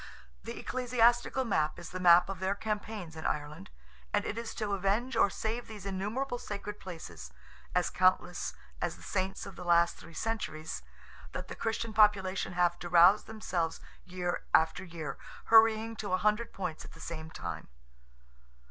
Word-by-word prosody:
The - - -6
ecclesiastical 245 +1 +2
map 155 -8 +1
is 170 -1 -9
the 185 - -4
map 175 -1 +7
of 195 -1 -5
their 190 +1 0
campaigns 210 -5 -4
in 160 - -7
Ireland. 145 -8 -4 0.4
And - - +1
it - - -2
is 230 0 -5
to 215 -3 -2
avenge 205 +6 0
or 200 - +5
save 225 +4 -3
these 210 -3 -9
innumerable 215 +7 -2
sacred 205 -1 -6
places—as 85 - -5
countless 185 0 +2 0.3
as - - -1
the - - -15
Saints 190 0 -2
of 195 - -9
the - - -8
last 170 -1 +4
three 165 - -13
centuries—that 155 - -5
the - - -6
Christian 225 0 -2
population 195 -3 +3
have 175 -1 +2
to 175 - -6
rouse 175 +4 +7
themselves 180 -7 -2 0.2
year 180 -1 -3
after 160 +3 +3
year, 165 -6 -6 0.3
hurrying 225 0 +5
to 200 -3 -3
a - - +4
hundred 210 +4 +1
points 180 -5 -4
at - - -12
the - - -14
same 160 -1 -6
time. - - -6
190 Hz, 160 wpm, -31 LUFS, 170-220 Hz, 0.4 s, map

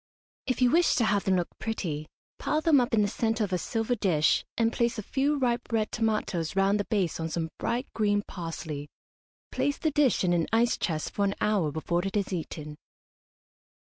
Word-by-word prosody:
If 255 -1 +1
you 245 - +5
wish 345 0 +4
to 235 - +2
have 205 -1 +1
them 190 -2 +3
look 175 -2 0
pretty, 155 -9 -3 0.3
pile 305 - 0
them 310 -5 +5
up 240 -2 0
in 210 - +4
the - - +2
centre 225 +1 0
of 195 -3 -2
a 180 - +1
silver 225 +6 -1
dish, 180 -9 +2
and 230 0 +2
place 235 -1 0
a 215 - -4
few 280 +7 0
ripe 245 -2 -1
red 220 -2 0
tomatoes 215 -7 -1
round 195 +2 +3
the 205 - -1
base 190 -8 0
on 160 0 -2
some 160 0 -2
bright 245 +3 -1
green 205 -2 +1
parsley. 160 -5 -6 0.6
Place 285 - 0
the 315 - 0
dish 290 -7 +3
in 175 -1 +2
an 170 -2 +1
ice 230 +2 +3
chest 155 -3 -2
for 200 - -1
an 200 - 0
hour 200 -8 +1
before 170 +3 -1
it 195 +1 -2
is 200 -1 -1
eaten. 155 -3 -5
205 Hz, 205 wpm, -28 LUFS, 175-235 Hz, 0.6 s, you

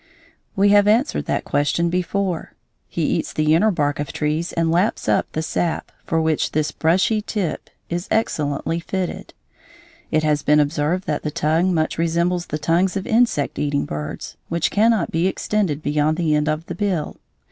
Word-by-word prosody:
We 200 +1 +4
have 205 0 +5
answered 225 +6 +2
that - - -1
question 145 +4 +1
before: 180 0 -2 0.3
he - - -3
eats - - 0
the 155 0 +2
inner 205 +7 +4
bark 145 -7 0
of 145 -2 -3
trees 155 +3 -1
and 165 -1 0
laps 180 +5 +1
up - - +1
the 160 - -2
sap, 165 +1 -2 0.2
for 165 - +1
which 160 -1 0
this 155 0 0
brushy 190 +7 +2
tip 200 -6 -3 0.2
is 175 +2 -3
excellently 155 -6 0
fitted. 185 +1 -4 0.7
It 155 -1 +1
has 150 -1 +2
been 150 +1 +4
observed 150 +5 0
that 150 - -1
the 150 - -2
tongue 165 +3 +1
much 160 -2 0
resembles 170 +1 0
the 150 - -3
tongues 175 +5 +1
of 195 - -4
insect 225 - +1
eating 145 -1 0
birds, 75 0 -6
which 170 0 0
cannot 220 -2 +2
be 165 +3 +1
extended 190 -6 -1
beyond 150 +2 +1
the 165 -3 +1
end 150 0 +1
of 155 +2 -2
the 175 - -5
bill. 180 -4 -2
165 Hz, 175 wpm, -21 LUFS, 150-185 Hz, 0.7 s, have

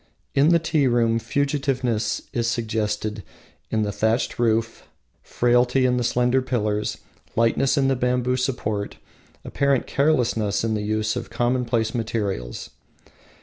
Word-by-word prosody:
In 140 +3 +4
the 170 - +6
tea 160 -4 +1
room 115 -2 +2
fugitiveness 130 -3 -1
is 120 -1 0
suggested 110 -2 -2 0.5
in 110 -1 0
the 105 - -1
thatched 110 +4 0
roof, 115 -1 0 0.3
frailty 125 +2 +2
in 125 -1 +2
the 125 - 0
slender 125 +2 +2
pillars, 105 -5 -1 0.4
lightness 115 +5 +2
in 135 -1 +3
the 135 - +2
bamboo 125 0 0
support, 110 -6 -2 0.5
apparent 140 -2 +1
carelessness 120 -9 +1
in 115 -1 0
the 105 - -1
use 110 +1 -1
of 120 -1 -5
commonplace 120 -1 0
materials. 100 - -3
120 Hz, 130 wpm, -23 LUFS, 110-130 Hz, 0.5 s, the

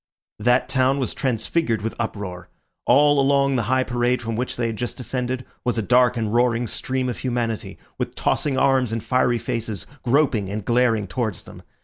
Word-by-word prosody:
That 120 +4 +3
town 130 +1 +2
was 130 - -2
transfigured 120 -1 -1
with 115 - -2
uproar. 95 -6 -5 0.4
All 145 +3 +5
along 140 0 +3
the 125 - +2
high 130 0 +3
parade 120 0 0
from 115 -1 -4
which 125 +3 -2
they 120 - -1
had 115 -1 -2
just 120 +1 -4
descended 125 0 -3 0.2
was 125 -1 0
a 110 - 0
dark 125 +3 +4
and 110 -2 -1
roaring 120 0 +2
stream 130 +3 -2
of 125 - -4
humanity, 120 -3 -2 0.2
with - - -3
tossing 140 -3 0
arms 130 -3 +3
and 115 -1 -3
fiery 125 -1 +2
faces, 115 -3 -4 0.2
groping 120 -6 +2
and 105 0 -4
glaring 120 -3 +2
towards 105 -1 -3
them. - - -12
120 Hz, 185 wpm, -23 LUFS, 115-130 Hz, 0.4 s, All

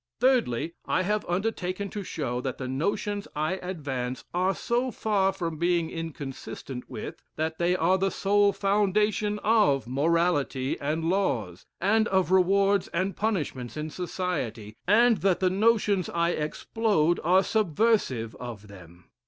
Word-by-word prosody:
Thirdly, 225 - +2
I 185 - +1
have 210 +2 0
undertaken 190 0 -2
to 205 - -5
show, 135 -9 -3
that 130 0 -4
the 130 - -5
notions 200 +9 -2
I 155 +5 0
advance 135 -8 -4
are 185 +2 +1
so 245 +2 0
far 205 -5 +1
from 170 -4 -4
being 170 -1 +1
inconsistent 140 -5 -7
with, - - -7
that 160 +1 -2
they 175 +1 +2
are 185 +2 +2
the 195 +1 +2
sole 200 +1 +3
foundation 210 +1 +1
of 205 - +3
morality 145 -1 +1
and 155 +3 -2
laws, 130 - -1
and 215 +4 +3
of 190 -1 +1
rewards 195 +1 +3
and 185 +3 -2
punishments 155 - -2
in 155 +1 -4
society, 150 - -4
and 230 +3 +5
that 190 -2 +1
the 185 -1 +2
notions 205 -2 +2
I 170 0 +1
explode 175 +2 0
are 185 +4 +4
subversive 190 - +1
of 110 -4 -8
them. 90 -3 -15
180 Hz, 140 wpm, -27 LUFS, 145-200 Hz, -, and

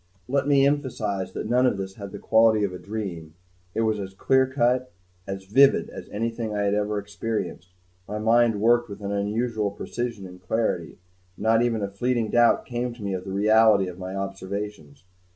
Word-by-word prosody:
Let 140 +1 0
me 140 -1 +5
emphasize 115 -9 -1
that - - -4
none 125 +2 +3
of 115 - 0
this 95 0 -5
had 100 -1 -9
the 100 - -7
quality 110 0 +4
of 95 -2 -1
a 90 - -7
dream; 90 -7 -6 0.4
it - - +1
was 110 -2 +1 0.2
clear 130 +5 +3
cut, 130 -1 +1 0.4
as 95 0 -5
vivid 135 +8 +4
as - - -9
anything 115 0 -3
I 105 - 0
had 100 0 +1
ever 105 0 0
experienced; 100 -3 -4 0.3
my 105 - -4
mind 115 0 +3
worked 120 +2 +3
with 100 +1 -8
an 100 0 -4
unusual 105 +1 -1
precision 115 +1 -5
and 90 0 -12
clarity, 90 -4 -1 0.4
and - - -8
not 115 +1 +4
even 115 -3 0
a - - 0
fleeting 115 +2 -1
doubt 120 0 +4
came 120 -1 -3
to 115 - -10
me 100 -1 -2
of 95 -1 -4
the 95 - -5
reality 105 0 +4
of 90 0 -8
my 95 +1 -5
observations. 95 -4 -6
105 Hz, 190 wpm, -25 LUFS, 100-120 Hz, 0.4 s, me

